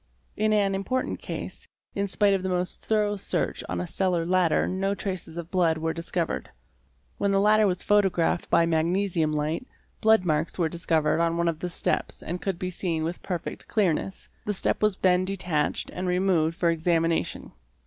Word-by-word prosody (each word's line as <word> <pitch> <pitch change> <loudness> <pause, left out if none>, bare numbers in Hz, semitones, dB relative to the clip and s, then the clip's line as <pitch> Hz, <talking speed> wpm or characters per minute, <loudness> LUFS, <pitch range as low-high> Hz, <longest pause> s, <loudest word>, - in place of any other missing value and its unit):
In 215 0 +1
an 200 -2 +2
important 255 +7 -2
case, - - -7 0.3
in 200 0 -1
spite 200 +1 +2
of 195 - +1
the 190 - -2
most 180 0 -2
thorough 210 -1 +1
search - - -2
on 90 - -2
a 90 - -2
cellar 180 - 0
ladder 180 -2 +2
no 195 +2 -1
traces 185 -5 -5
of 170 -1 -6
blood 170 -4 +2
were 160 0 -1
discovered. 170 0 -3 0.7
When 200 - +1
the 195 0 +3
ladder 210 +1 +5
was 180 -1 -1
photographed 190 -5 +2
by 170 0 +4
magnesium 165 0 +1
light, 155 - -2 0.3
blood 220 -3 +4
marks 155 0 0
were 170 -3 +1
discovered 160 -2 +1
on 170 0 +1
one 170 0 +1
of 165 -2 -1
the 180 - -3
steps 175 - -2
and 175 +2 -4
could 195 -3 -2
be 185 +1 -3
seen 170 -3 -2
with 170 +2 -3
perfect 175 -3 -5
clearness. 190 -2 0 0.2
The 210 - -1
step - - 0
was 210 -3 +2
then 180 -1 +3
detached 180 -6 -1
and 185 +1 -3
removed 180 -3 +1
for 170 -1 +2
examination. 165 0 0
180 Hz, 180 wpm, -26 LUFS, 165-195 Hz, 0.7 s, ladder